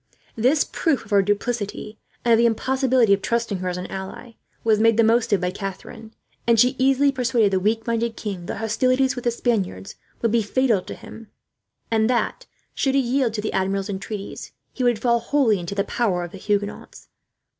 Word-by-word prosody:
This 255 +7 +3
proof 295 -8 -1
of 215 - -17
her 200 -1 +5
duplicity, 205 +1 -3 0.3
and 235 - +3
of 225 - +5
the 235 - +5
impossibility 255 -1 +2
of 200 - +1
trusting 230 -3 -1
her 185 0 -2
as 180 - -3
an 180 - -5
ally, 190 +5 -7 0.3
was 220 -2 +3
made 225 0 +4
the 230 - +5
most 230 +1 +2
of 200 - +3
by 180 0 0
Catherine; 195 +3 -8 0.4
and 230 -1 +4
she 250 +3 +4
easily 270 +2 +3
persuaded 240 -5 +1
the 190 - +3
weak 220 +3 0
minded 230 0 -1
king 190 -5 -5
that - - -4
hostilities 255 +5 +1
with 245 - -7
the - - +4
Spaniards 205 - -2 0.3
would 230 - +2
be 235 0 +3
fatal 225 -1 +1
to - - -8
him, 225 -1 -12 0.6
and 220 0 +2
that, 245 -2 -1 0.3
should 270 -1 0
he - - +5
yield 250 -2 0
to 210 - -2
the 215 - -3
Admiral's 195 +1 -1
entreaties, 200 +1 -6 0.2
he 255 - -3
would 240 -2 +3
fall 235 +1 +2
wholly 235 -4 +2
into 175 +3 -5
the 200 - +1
power 195 -5 -1
of 175 - -7
the 195 - -10
Huguenots. 205 +1 -3
225 Hz, 200 wpm, -23 LUFS, 200-245 Hz, 0.6 s, her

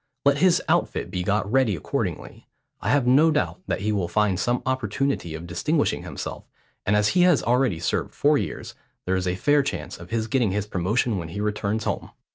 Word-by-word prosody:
Let 140 0 +4
his 180 +1 +4
outfit - - 0
be 90 - -2
got 100 +2 0
ready 130 -6 +3
accordingly. 75 - -4 0.3
I 105 - -2
have 135 0 +3
no 140 +6 +5
doubt 155 +4 -1
that - - -2
he 105 +2 0
will 100 -5 0
find 105 -2 +1
some 120 0 0
opportunity 130 - -1
of 80 +2 -7
distinguishing 145 - 0
himself; - - -6 0.4
and 105 - +3
as 105 0 +3
he 180 - +3
has 175 -5 +4
already 125 -6 +2
served 85 - -2
four - - +3
years, - - -5 0.3
there 95 - +1
is 95 0 -1
a 90 - 0
fair 145 +9 +3
chance 90 - -5
of 85 +1 -11
his 115 -1 -1
getting 115 -5 +1
his 105 0 -1
promotion 105 +3 0
when 80 -2 -6
he 85 - -6
returns 105 +1 -1
home.' - - -3
105 Hz, 205 wpm, -24 LUFS, 95-135 Hz, 0.4 s, no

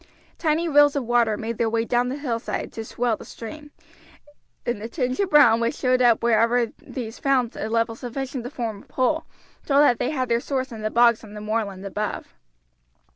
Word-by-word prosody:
Tiny 320 +1 +1
rills 290 -2 +5
of 280 - 0
water 235 -2 +2
made 225 +1 -5
their 230 - +2
way 225 0 0
down 245 +1 +1
the 260 - -3
hillside 240 -6 -3
to 225 - -5
swell 235 0 -1
the - - -11
stream, 295 +6 -9 1.0
and 240 -3 -2
the 225 - -5
tinge 255 -1 -2
of 395 -2 +1
brown 285 -8 +6
which 235 0 0
showed 255 0 +1
up 235 -3 +4
wherever 235 +1 +3
these 230 -3 -7
found 260 -4 +1
a 215 - -4
level 230 0 +1
sufficient 255 +2 -5
to 245 - -5
form 225 -6 -5
a - - -20
pool 305 +5 0 0.4
told 280 0 +4
that 245 -5 +3
they - - 0
had 260 -4 -1
their 235 -1 +2
source 260 0 -3
in 225 -2 -7
the 215 - -1
bogs 235 0 +4
on 210 -1 -11
the - - -6
moorland 210 -3 -3
above. 210 +2 -4
240 Hz, 205 wpm, -24 LUFS, 225-265 Hz, 1.0 s, brown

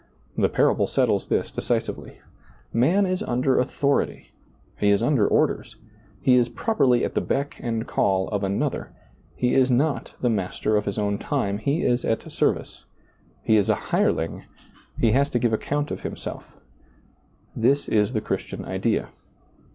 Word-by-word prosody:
The - - +2
parable - - +2
settles - - +1
this - - 0
decisively. - - -3 0.5
Man 165 - +3
is 185 0 -1
under 130 +2 +1
authority, 140 +2 -1 0.5
he 105 - +3
is 100 +2 +3
under 120 -6 +3
orders, - - 0 0.5
lie 130 - +6
is 120 -1 +4
properly 135 - +2
at - - -4
the - - +1
beck 140 +1 -2
and 115 -2 -2
call 95 -5 +1
of 105 -2 -2
Another, 100 0 -2 0.4
he 125 0 0
is 130 -1 +4
not 140 +4 0
the 125 - 0
master 105 0 0
of 105 - +1
his 100 - -3
own 100 -1 0
time, 110 -10 -1
he 140 +8 0
is 120 0 +1
at 115 - -2
service, - - -1 0.6
he 110 - +4
is 105 +1 +2
a 110 - +4 0.2
hireling, - - 0 0.5
he 115 - +3
has 140 +4 +2
to 125 - 0
give 120 -1 +1
account 145 +6 -1
of - - -3
himself - - -7 1.0
This 135 +5 +2
is 105 +2 +1
the 110 - 0
Christian 105 - -4
idea. - - -1
120 Hz, 160 wpm, -24 LUFS, 105-140 Hz, 1.0 s, lie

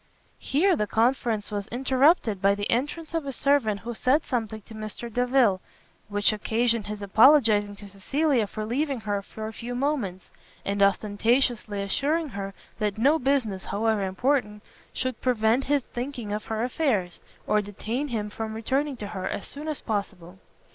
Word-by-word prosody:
Here 345 +7 +2
the 210 -7 -1
conference 225 -2 +1
was 205 -1 -3
interrupted 255 - +2
by 200 0 +4
the 205 0 -3
entrance 295 +7 -2
of 325 -4 -2
a - - -2
servant 255 -7 +1
who 235 +1 -5
said 260 +6 +2
something 220 -4 -3
to 225 - -13
Mr 215 +2 -7
Delvile, 245 -6 +3 0.5
which 205 +1 +2
occasioned 225 +1 0
his 210 -1 -5
apologizing 215 -2 +5
to 205 0 -10
Cecilia 240 +5 0
for 215 +1 -5
leaving 270 +2 -1
her 205 -2 -1
for 215 +2 -8
a 220 - -5
few 245 +2 -6
moments, 245 -9 -2 0.3
and 200 0 -1
ostentatiously 210 +1 +2
assuring 295 +10 0
her 195 -3 -6 0.2
that 210 -2 -1
no 285 +8 +4
business, 245 -8 0
however 220 0 0
important, 210 +2 0 0.3
should 255 -2 -3
prevent 240 +1 +2
his 285 -1 +2
thinking 240 -4 -5
of 210 - -4
her 220 0 -2
affairs, 245 - 0 0.3
or 210 - +2
detain 220 +7 -4
him 215 -5 -3
from 220 0 -5
returning 270 +5 -1
to 210 - -6
her 190 -3 -4
as 200 - -4
soon 295 +2 -7
as 305 -2 -3
possible. 195 -4 -4
225 Hz, 165 wpm, -26 LUFS, 205-265 Hz, 0.5 s, apologizing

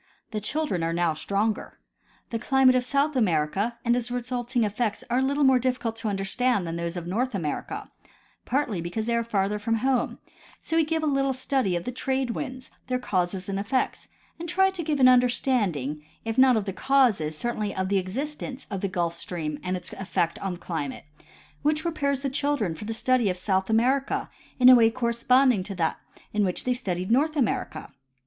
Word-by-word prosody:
The 215 -2 -3
children 290 - -1
are 165 0 0
now 170 -1 +1
stronger. 200 +7 -2 0.5
The 230 - -1
climate 265 +2 +4
of 255 -1 +2
South 280 +3 +1
America 200 +2 +1
and 235 0 +3
its 245 0 -1
resulting 245 0 -1
eff'ects 215 +1 -1
are 245 - +3
a - - +2
little 280 +2 +1
more 265 -2 +5
difficult 250 -2 -1
to 225 - -3
understand 200 +2 0
than 165 0 -4
those 170 +1 -3
of 170 - -5
North 225 +7 -1
America, 155 -6 -4 0.5
partl}^ 245 - -1
because 175 +6 -3
they 235 0 0
are 235 - +1
farther 210 -2 0
from 225 +2 0
home; 255 +3 0 0.4
so 325 - -3
we 325 -1 +4
give 320 0 -1
a - - +1
little 275 -2 +1
study 260 -7 0
of 170 - -2
the 250 - -3
trade 260 0 -1
winds, 260 0 -6 0.2
their 255 - 0
causes 185 -5 -1
and 195 -1 -2
effects, 235 +6 -1 0.3
and 340 0 -5
try 385 +2 +3
to 375 -2 -5
give 295 -2 -1
an 255 - +7
understanding, 235 - +2 0.2
if 225 0 -2
not 260 -2 +6
of 210 - -1
the 195 - -3
causes, 215 - +2
certainly 215 0 -2
'of 190 0 -1
the 200 -1 +3
existence 270 +7 -5
of 195 -2 -3
the 195 - 0
Gulf 175 -3 -1
Stream 160 -3 -5
and 185 0 -2
its 180 - -6
efl'ect 170 -3 -2
on 185 -3 -3
climate, 160 -7 -5 0.6
which 305 +1 +1
prepares 280 -5 -1
the 275 - 0
children 280 - 0
for 160 - -8
the 225 - -3
study 245 -1 +2
of 180 - -2
South 190 +1 0
America 255 +5 +1 0.3
in 250 - +6
a 255 - +11
Avay 230 -2 +6
corresponding 240 0 +3
to 195 +1 -6
that 165 -3 0 0.4
in 210 0 +2
which 185 -2 0
they 250 - +1
studied 185 -6 -3
North 300 +6 +3
America. 220 - -2
230 Hz, 195 wpm, -26 LUFS, 190-260 Hz, 0.6 s, a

